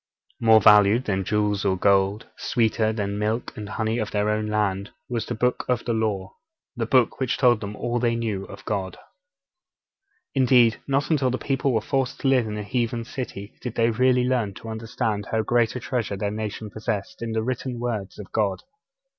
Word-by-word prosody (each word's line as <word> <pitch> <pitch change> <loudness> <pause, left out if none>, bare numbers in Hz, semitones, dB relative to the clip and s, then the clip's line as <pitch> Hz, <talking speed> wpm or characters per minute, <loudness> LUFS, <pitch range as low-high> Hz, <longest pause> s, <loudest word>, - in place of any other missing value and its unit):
More 110 -1 +6
valued 105 +3 +6
than 95 -2 0
jewels 105 0 0
or 95 -1 +1
gold, 100 +2 +2
sweeter 110 -1 +1
than 105 -2 -2
the 100 - -3
milk 110 +3 -2
and 105 -1 -7
honey 110 +2 -1
of 110 - -2
their 105 0 0
own 105 0 -1
land, 105 -2 0 0.2
was 120 -3 -3
the - - -3
Book 125 +3 0
of 125 -2 0
the 120 - 0
Law 105 -4 -1 0.4
the 115 -2 -2
Book 125 -1 +3
which 130 -2 0
told 120 -4 +4
them 105 0 -5
all 120 +2 -1
they 120 -1 +1
knew 110 -4 -2
of 100 0 -12
God. 95 -2 -3 1.4
Indeed, 125 -4 +4
not 140 +3 0
until 140 -5 +2
the 130 - -1
people 135 0 0
were 110 -3 +1
forced 135 +3 -1
to - - 0
live 130 -4 +3
in 105 0 -4
a 105 - -4
heathen 115 +1 -1
city 110 -5 -6
did 125 -3 -5
they 115 0 +3
really 125 +2 +3
learn 120 -6 0
to 115 - -9
understand 110 -2 -3
how 110 -1 +1
great 120 +1 +2
a - - -2
treasure 120 -5 -2
their 100 +1 -2
nation 110 0 -5
possessed 110 -2 -4
in 115 -1 -3
the 110 0 0
written 125 0 -3
words 110 -5 -3
of 105 - -10
God. 100 -3 0
110 Hz, 200 wpm, -24 LUFS, 105-120 Hz, 1.4 s, More